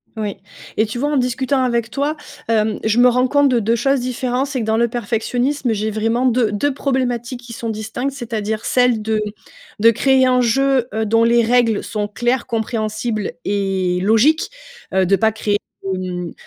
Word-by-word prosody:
Oui. 210 Hz, -2 st, -4 dB, 0.4 s
Et 220 Hz, -, +3 dB
tu 225 Hz, +3 st, -5 dB
vois, 290 Hz, +2 st, 0 dB
en 295 Hz, -, +1 dB
discutant 260 Hz, +2 st, 0 dB
avec 235 Hz, -2 st, 0 dB
toi, 285 Hz, +4 st, -1 dB, 0.3 s
hem, 220 Hz, -1 st, +1 dB
je 220 Hz, +2 st, +2 dB
me 250 Hz, -, +7 dB
rends 250 Hz, +1 st, +2 dB
compte 285 Hz, +1 st, +3 dB
de 245 Hz, -2 st, +2 dB
2 225 Hz, +2 st, +1 dB
choses 270 Hz, +3 st, +1 dB
différentes: 255 Hz, +1 st, -1 dB
c'est 275 Hz, -2 st, -3 dB
que -, -, -2 dB
dans 220 Hz, 0 st, +1 dB
le 235 Hz, +1 st, +3 dB
perfectionnisme 240 Hz, +3 st, -1 dB
j'ai 215 Hz, +1 st, -1 dB
vraiment 225 Hz, +4 st, 0 dB
2- 235 Hz, -3 st, +2 dB
2 210 Hz, +8 st, 0 dB
problématiques 255 Hz, -3 st, -2 dB
qui 240 Hz, -, -12 dB
sont 230 Hz, 0 st, -5 dB
distinctes, 220 Hz, +5 st, -3 dB
c'est-à-dire 220 Hz, -4 st, -3 dB
celle 250 Hz, -3 st, +2 dB
de 215 Hz, 0 st, 0 dB, 0.6 s
de 230 Hz, -, +6 dB
créer 260 Hz, +2 st, +3 dB
un 255 Hz, 0 st, +3 dB
jeu, 260 Hz, +1 st, +2 dB
heu, 220 Hz, 0 st, -1 dB
dont 225 Hz, +2 st, +3 dB
les 235 Hz, 0 st, +4 dB
règles 230 Hz, -2 st, +2 dB
sont 210 Hz, -2 st, -3 dB
claires, 240 Hz, +4 st, -1 dB
compréhensibles 215 Hz, -2 st, -2 dB
et 190 Hz, -3 st, 0 dB
logiques, 240 Hz, -, +3 dB, 0.4 s
heu, 190 Hz, -1 st, +2 dB
de 195 Hz, -, +4 dB
pas 220 Hz, +2 st, +2 dB
créer 210 Hz, -1 st, -1 dB, 0.4 s
de, -, -, -2 dB, 0.3 s
mmh, -, -, -9 dB
235 Hz, 190 wpm, -19 LUFS, 215-255 Hz, 0.6 s, me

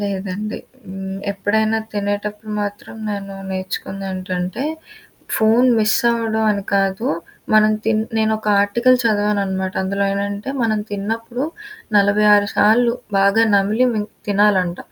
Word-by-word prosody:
లేదండి. 200 Hz, +1 st, -3 dB, 0.3 s
హ్మ్. 190 Hz, 0 st, -6 dB, 0.2 s
ఎప్పుడైనా 215 Hz, +3 st, +1 dB
తినేటప్పుడు 210 Hz, +1 st, -3 dB
మాత్రం 205 Hz, +1 st, -6 dB, 0.2 s
నేను 200 Hz, -1 st, -5 dB, 0.2 s
నేర్చుకుందేంటంటే 185 Hz, +1 st, -4 dB, 0.7 s
ఫోన్ 225 Hz, +3 st, +4 dB
మిస్ 215 Hz, 0 st, +3 dB
అవ్వడం 225 Hz, -1 st, 0 dB
అని 200 Hz, -1 st, -1 dB
కాదు. 195 Hz, +3 st, +1 dB, 0.5 s
మనం 215 Hz, 0 st, +5 dB
తిన్ 220 Hz, 0 st, +2 dB, 0.2 s
నేనొక 220 Hz, 0 st, 0 dB, 0.2 s
ఆర్టికల్ 235 Hz, +5 st, +3 dB
చదవాననమాట. 200 Hz, -3 st, 0 dB
అందులో 200 Hz, +1 st, -1 dB
ఏంటంటే, 200 Hz, +4 st, -3 dB
మనం 220 Hz, -2 st, +1 dB
తిన్నప్పుడు 225 Hz, +5 st, -3 dB, 0.5 s
46 205 Hz, 0 st, +4 dB
సార్లు 235 Hz, +3 st, +4 dB, 0.3 s
బాగా 200 Hz, +3 st, +4 dB
నమిలి 210 Hz, +5 st, +3 dB
మిం 210 Hz, -1 st, -1 dB, 0.2 s
తినాలంట. 195 Hz, -4 st, +2 dB
205 Hz, 110 wpm, -19 LUFS, 195-220 Hz, 0.7 s, మనం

